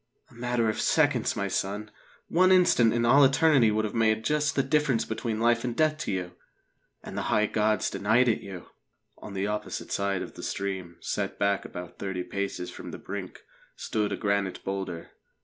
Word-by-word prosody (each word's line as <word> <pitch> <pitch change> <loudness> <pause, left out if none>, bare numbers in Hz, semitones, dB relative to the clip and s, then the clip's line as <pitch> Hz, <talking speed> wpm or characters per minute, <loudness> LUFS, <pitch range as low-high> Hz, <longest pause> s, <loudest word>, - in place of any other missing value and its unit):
"A - - -18
matter 120 -1 0
of 110 - -1
seconds, 145 -7 +2
my 100 -3 -1
son. 105 +2 -3 0.4
One 185 +2 +4
instant 175 -11 +5
in 120 0 +1
all 135 +4 +6
eternity 135 -3 +5
would 110 +1 0
have 105 - -4
made 110 -1 +1
just 150 +1 +1
the 135 - +2
difference 135 -3 +1
between 110 0 -3
life 115 0 +2
and 120 -2 -2
death 155 -1 +2
to - - -3
you. 90 -2 -3 0.7
And - - -8
the - - -1
high 110 -2 +3
gods 110 0 +1
denied 115 +5 +2
it 115 - +1
you!" 95 -3 -9 0.5
On 100 - -9
the 95 +1 -1
opposite 105 +1 -4
side 100 -1 0
of - - -9
the - - -10
stream, 95 -3 -4
set - - -3
back 100 -1 +1
about 90 -1 -9
thirty 95 -2 -3
paces 100 -2 -4
from - - -9
the - - -7
brink, - - -7 0.3
stood 105 -1 -2
a - - -2
granite 100 -2 -1
boulder. 95 -4 -5
110 Hz, 190 wpm, -27 LUFS, 100-125 Hz, 0.7 s, all